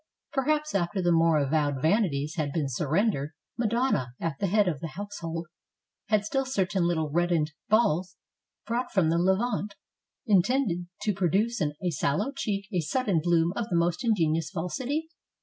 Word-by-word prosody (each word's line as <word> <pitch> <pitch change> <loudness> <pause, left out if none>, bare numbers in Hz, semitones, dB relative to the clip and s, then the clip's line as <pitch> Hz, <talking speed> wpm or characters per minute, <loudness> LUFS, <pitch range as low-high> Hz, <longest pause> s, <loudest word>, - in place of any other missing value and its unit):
Perhaps, 300 +2 0
after 190 0 0
the 175 -1 +2
more 165 -1 +4
avowed 145 -1 +1
vanities 155 - +1
had 155 -5 -2
been 150 -1 -1
surrendered. 150 - 0 0.2
Madonna, 230 - 0
at 165 -4 -3
the 200 - +1
head 205 +1 +3
of 155 -6 -1
the 165 - -4
household, 175 -5 -5 0.6
had 210 -1 +2
still 270 +4 0
certain 195 -8 0
little 160 -3 0
reddened 170 -2 +1 0.2
balls 185 -5 +2 0.5
brought 240 +3 -2
from 170 -5 +2
the 170 - +2
Levant, 200 +3 0 0.5
intended 195 -3 +2 0.2
to 210 - +1
produce 195 +5 +1
on 150 -2 0
a 180 - +1
sallow 160 - 0
cheek 200 -5 -2
a 180 - +2
sudden 190 - 0
bloom 170 +1 +2
of 235 +1 -3
the 175 - 0
most 170 +6 +1
ingenuous 165 -8 +1
falsity? 255 - -3
180 Hz, 160 wpm, -27 LUFS, 160-215 Hz, 0.6 s, more